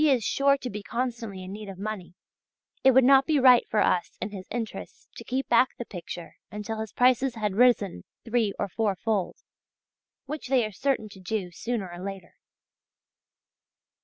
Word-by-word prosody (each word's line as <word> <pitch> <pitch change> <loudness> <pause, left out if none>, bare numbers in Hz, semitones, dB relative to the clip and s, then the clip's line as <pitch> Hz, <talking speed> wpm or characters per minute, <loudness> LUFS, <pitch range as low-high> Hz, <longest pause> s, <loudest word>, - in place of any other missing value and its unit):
is 265 -6 +4
sure 275 +5 +3
to 260 - -6
be 210 -3 -5
constantly 230 -4 -4
in 185 - -8
need 210 0 -7
of 190 - -8
money, 200 -3 -6 0.7
it 265 - +7
would 265 0 +6
not 270 +1 +6
be 305 -3 +3
right 250 -2 +6
for 215 - +2
us 180 -3 +1
in 210 - -4
his 190 -2 -8
interests 230 -2 -6
to - - -9
keep 265 +1 -2
back 240 +2 +3
the 240 - -5
picture 175 -3 -8
until 210 +1 -5
his 220 -2 -5
prices 255 0 +3
had 210 -3 -1
risen 205 - +3 0.2
three 230 -3 +1
or - - -1
four 205 +1 -1
fold, 205 -2 -2 0.8
which 290 0 -6
they 250 -3 +3
are 215 - -5
certain 260 +1 -1
to 200 -2 -13
do 185 -1 -3
sooner 225 +2 -3
or 175 +1 -8
later." 195 -3 -7
220 Hz, 180 wpm, -27 LUFS, 195-250 Hz, 0.8 s, it